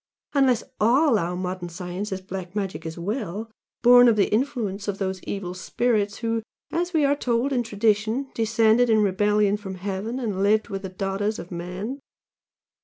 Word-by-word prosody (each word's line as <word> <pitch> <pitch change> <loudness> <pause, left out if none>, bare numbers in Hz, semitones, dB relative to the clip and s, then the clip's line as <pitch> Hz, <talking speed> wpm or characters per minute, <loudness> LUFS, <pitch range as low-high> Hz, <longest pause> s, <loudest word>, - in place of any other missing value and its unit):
unless 265 -5 +3 0.2
all 245 +2 +4
our 175 0 -2
modern 180 -1 -4
science 180 +4 -5
is 190 0 -3
'black 185 0 -7
magic' 185 -6 -3
as 160 - -7
well, 210 +3 -4 0.3
born 245 0 +8
of 230 - +5
the 205 -1 +2
influence 215 -5 -1
of 200 -1 -2
those 190 -2 -3
evil 190 -3 -4
spirits 205 +2 0
who, 230 -1 -1 0.3
as 350 +1 -1
we 315 -4 +3
are 280 +1 +3
told 250 0 0
in 250 - +2
tradition, 220 +3 0
descended 225 +1 +3
in 215 -1 +4
rebellion 205 +1 +2
from 195 -2 -7
heaven 200 +6 -4
and 210 -6 -2
lived 215 +3 +2
with 195 -2 -4
the 190 - -5
daughters 195 +3 -2
of 175 - -9
men! 180 +9 -5
210 Hz, 175 wpm, -24 LUFS, 190-235 Hz, 0.3 s, born